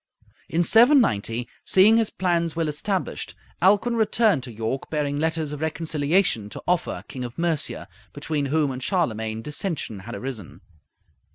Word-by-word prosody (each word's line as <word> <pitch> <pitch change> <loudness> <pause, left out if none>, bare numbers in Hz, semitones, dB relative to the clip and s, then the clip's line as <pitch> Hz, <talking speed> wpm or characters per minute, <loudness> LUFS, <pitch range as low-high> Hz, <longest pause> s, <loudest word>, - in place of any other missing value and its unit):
In 170 +2 +1
790, 175 - +4 0.2
seeing 210 +4 +5
his 225 -2 +2
plans 170 -3 0
well 165 -1 0
established, 180 +6 -3 0.3
Alcuin 210 +5 +3
returned 220 - +2
to 125 -1 -8
York 115 +4 -4
bearing 145 -2 -1
letters 160 0 -1
of 150 0 -6
reconciliation 160 - 0
to - - -9
Offa, 165 - -1
King 130 - -6
of 120 -1 -7
Mercia, 165 -3 -1 0.2
between 150 -3 -2
whom 150 0 +1
and 130 0 -6
Charlemagne 110 - -1
dissension 150 - -3
had 115 +5 -8
arisen. 125 -9 -7
155 Hz, 145 wpm, -24 LUFS, 125-185 Hz, 0.3 s, seeing